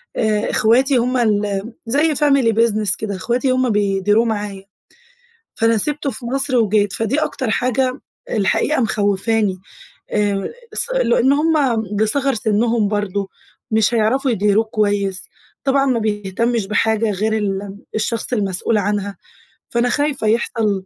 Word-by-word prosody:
آآ 215 -2 0
إخواتي 255 +5 +3
هم 250 +2 +1
الم 210 -1 0
زي 295 +6 +1
family 275 -6 +2
business 215 -4 +2
كده 205 -2 -4
إخواتي 240 +7 -1
هم 255 0 +1
بيديروه 205 +1 +2
معايا، 205 -3 -3 0.9
فأنا 225 0 +2
سِبته 295 +5 -1
في 240 0 -8
مصر 265 +1 0
وجيت، 210 -3 +2
فدي 225 +6 -1
أكتر 260 -5 -2
حاجة 255 +3 0 0.3
الحقيقة 230 +8 +1
مخوِّفاني. 205 -1 0 0.5
آآ 205 -2 0 0.2
اص 470 - +1
لإن 265 - +3
هم 285 -6 +2
بصِغَر 265 +6 +1
سِنّهم 220 0 +1
برضه 205 -1 -2 0.4
مش 220 +1 +2
هيعرفوا 245 +5 +1
يديروه 210 0 +2
كويس. 205 -3 -1 0.4
طبعًا 275 0 +2
ما 255 -3 +1
بيهتمش 215 +1 -1
بحاجة 220 +1 +1
غير 210 +2 -1
الم 200 -2 -3 0.2
الشخص 220 +2 -2
المسئول 205 -1 +1
عنها، 200 -1 -2 0.6
فأنا 240 +1 +2
خايفة 285 -3 -1
يحصل 215 -3 0
220 Hz, 130 wpm, -19 LUFS, 205-250 Hz, 0.9 s, إخواتي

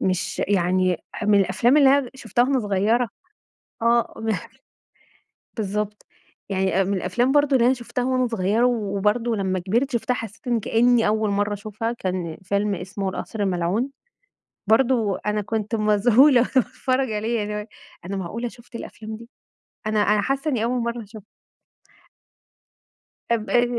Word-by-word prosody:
مش 185 -1 -1
يعني 185 -2 +1
ح 215 - -5
من 205 -1 +5
الأفلام 210 +9 +3
اللي 280 -3 +6
أنا 280 - +5
د - - -18
شُفتها 240 -2 0
وأنا 265 -1 +1
صغيرة 210 +4 +1 0.7
آه، 235 0 +2
ب 225 0 0 1.3
بالضبط، 210 0 -3 0.4
يعني 190 -1 +1
أ - - -1
من 200 - -1
الأفلام 240 +9 0
برضه 290 -2 +4
اللي 235 - +3
أنا 260 - +4
شُفتها 245 0 -4
وأنا 255 -1 +1
صغيرة 220 +1 +1
و 215 -5 -1
وبرضه 225 +3 +1
لمّا 190 -2 -1
كبِرت 230 - 0
شُفتها، 240 +1 0
حسّيت 225 +1 -8
إن 235 -2 +1
كأني 235 +1 +3
أول 215 0 +1
مرة 205 +1 0
أشوفها، 215 +3 -4
كان 180 -7 -4
فيلم 200 +1 0
اسمه 190 +2 -4
القصر 205 +3 -5
الملعون، 190 +7 0 0.8
برضه 225 -2 +3
أنا 210 0 +1
كنت 220 +1 -3
مذهولة 230 +5 +5
وأنا 245 - 0
باتفرج 255 0 +1
عليه، 225 +2 -1
يعني 210 - -1
اللي 210 - -3
هو - - -2
إيه، 210 - -10 0.4
أنا 195 +2 -4
معقولة 210 +6 -4
شُفت 235 +1 -18
الأفلام 220 -1 -8
دي! 230 +1 -13 0.6
أنا 215 -1 +1
أنا 210 0 +3
حاسة 275 +7 -1
إني 230 -4 0
أول 245 +1 0
مرة 235 0 -3
أشوفها. 210 0 -13 2.1
اب 220 -2 0
اي 240 0 +4
220 Hz, 165 wpm, -23 LUFS, 200-240 Hz, 2.1 s, اللي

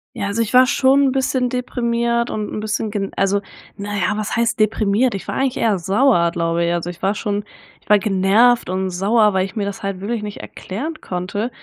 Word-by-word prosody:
Ja, 200 - -3
also 200 +3 -1
ich 230 +1 -2
war 255 +1 +7
schon 270 +1 +3
'n 270 - +3
bisschen 260 -1 0
deprimiert 235 -1 -1
und 210 -1 -4
'n - - -4
bisschen 215 0 -2
gen 200 -2 -3
also, 195 +1 +1 0.4
na 205 +1 -5
ja, 185 0 +1
was 215 -1 -3
heißt 235 0 0
deprimiert? 215 +2 +2
Ich 195 - -6
war - - -3
eigentlich 270 -2 0
eher 215 -5 +1
sauer, 190 -1 +2
glaube 170 0 0
ich. 170 - 0
Also 175 0 -2
ich 175 -1 -9
war 195 +2 +1
schon 205 -1 -3 0.4
ich - - -28
war 210 - +7
genervt 205 +5 +3
und 190 +1 -1
sauer, 210 +4 +2
weil 190 0 +1
ich 195 - -10
mir 210 - -1
das 200 -1 -6
halt 195 -1 -4
wirklich 225 +2 -3
nicht 210 -1 -7
erklären 300 - -6
konnte. 185 +6 -4
210 Hz, 220 wpm, -19 LUFS, 195-235 Hz, 0.4 s, war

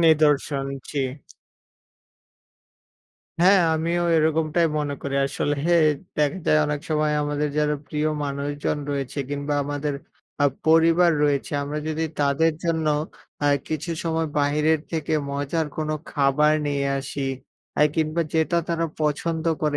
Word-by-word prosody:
নিদর্শন, 150 -3 +3 0.2
জি। 145 - -2 2.4
হ্যাঁ, 190 +1 +6
আমিও 170 +2 0
এরকমটাই 160 +1 +2
মনে 145 -1 -2
করি। 140 -1 -3
আসলে 145 +1 -1 0.6
দেখা 150 +5 +1
যায়, 155 - +5
অনেক 150 -1 -2
সময় 155 0 +1
আমাদের 145 0 -1
যারা 150 0 +2
প্রিয় 150 0 0 0.2
মানুষজন 145 +1 -2
রয়েছে 140 0 -3
কিংবা 145 +1 -2
আমাদের 145 0 -2 0.5
আ - - +5 0.2
পরিবার 165 +2 +5
রয়েছে 140 -2 0
আমরা 145 +2 -3
যদি 160 +1 -1 0.2
তাদের 145 +3 +3
জন্য 160 -2 0 0.6
আ - - +4 0.2
কিছু 155 +2 -3
সময় 165 0 0
বাহিরের 150 +2 +2
থেকে 160 -1 -2 0.2
মজার 145 +3 -1
কোনো 155 0 -1 0.2
খাবার 145 +1 +3
নিয়ে 140 -1 0
আসি 140 +1 -5 0.6
এ - - +7
কিংবা 160 +1 +1
যেটা 160 +2 +2
তারা 165 0 0
পছন্দ 160 +2 -1 0.2
করে 150 -1 +1
150 Hz, 130 wpm, -24 LUFS, 145-160 Hz, 2.4 s, এ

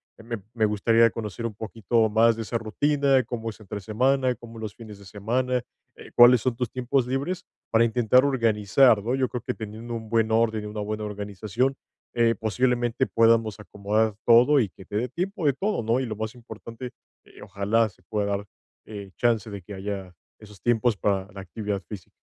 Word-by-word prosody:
que - - -15
me 115 -1 -5
me 110 -2 +2
gustaría 115 +2 +4
conocer 110 0 -6
un 110 - -9
poquito 110 +1 0
más 115 +2 +4
de 115 - -4
esa 115 +1 -2
rutina, 140 +3 +2
cómo 115 0 -5
es 110 - -10
entre 105 0 -7
semana, 125 +5 +1
cómo 115 -1 -12
los 110 -2 -6
fines 110 -3 -11
de 100 - -14
semana, 120 +6 -1 0.3
eh, - - -13
cuáles 120 -1 +7
son 125 -1 0
tus 125 -1 -2
tiempos 125 +1 0
libres 145 +8 -2 0.3
para 115 0 +5
intentar 120 +2 +3
organizar, 115 -3 +3
¿no? 125 +3 0
Yo 130 -1 +1
creo 125 - -5
que - - -4
teniendo 110 +2 -7
un 110 -1 -7
buen 115 -1 +2
orden 110 -1 +2
y - - -5
una 105 0 -5
buena 105 +1 -3
organización, 105 +5 -2 0.4
eh, 115 -1 +3
posiblemente, 120 +2 0
podamos 115 -2 +3
acomodar 105 +2 -1
todo 125 +5 +6
y 110 - +1
que 95 - -15
te 105 - -4
dé 120 +3 -1
tiempo 180 - -2
de 140 - +4
todo, 200 - -1
¿no? 115 +3 +1
Y 130 - -1
lo 110 -2 -4
más 110 +2 -5
importante, 115 +1 -9 0.3
eh, - - -17
ojalá 105 +3 0
se 90 - -25
pueda 105 +2 -2
dar, 100 0 -2 0.4
eh, 100 -2 -8
chance 115 -3 +1
de 100 -2 -8
que 100 - -9
haya 95 -1 -5 0.2
esos 105 -2 -15
tiempos 120 -1 +2
para 95 0 -1
la 100 - -8
actividad 100 +2 -4
física. 100 -5 -9
115 Hz, 200 wpm, -25 LUFS, 105-120 Hz, 0.4 s, cuáles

